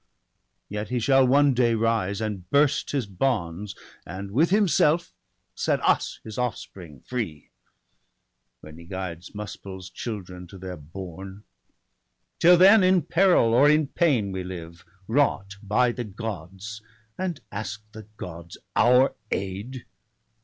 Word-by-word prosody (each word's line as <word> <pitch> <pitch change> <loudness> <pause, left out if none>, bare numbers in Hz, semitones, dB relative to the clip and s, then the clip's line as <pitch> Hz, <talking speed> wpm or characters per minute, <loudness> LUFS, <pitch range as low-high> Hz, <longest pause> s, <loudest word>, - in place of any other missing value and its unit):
Yet 105 +1 -5
he 125 0 0
shall 135 +2 +4
one 140 +1 +4
day 120 -2 +2
rise, 110 -3 0
and 100 -5 -4
burst 145 0 +2
his 140 -5 -1
bonds. 100 -3 -2 0.3
And 95 +3 -7
with 150 +10 +3
himself 175 -4 +2 0.4
set - - 0
us - - +1
his 110 +1 -7
offspring 90 - -5
free. 105 -12 -5 1.1
When 75 +2 -12
he 85 - -12
guides 90 0 -7
Muspel's 95 -2 -8
children 90 -5 -7
to 95 - -12
their 90 0 -7
bourne. 95 +5 -9 1.0
Till 175 +1 +7
then 195 +3 +7
in 185 -2 +4
peril 170 -8 +3
or 140 +5 +6
in 150 -2 +3
pain 130 - +1
we 95 -1 -4
live. 85 -1 -8 0.2
Wrought 105 -6 +1
by 120 +4 +2
the 120 +1 -4
Gods 105 0 -7 0.2
— 110 0 -39
and 185 -5 -2
ask 105 +1 -5
the 110 -1 -11
Gods 85 -1 -8 0.2
our 125 +3 +5 0.2
aid 100 +7 -4
105 Hz, 135 wpm, -25 LUFS, 95-130 Hz, 1.1 s, Till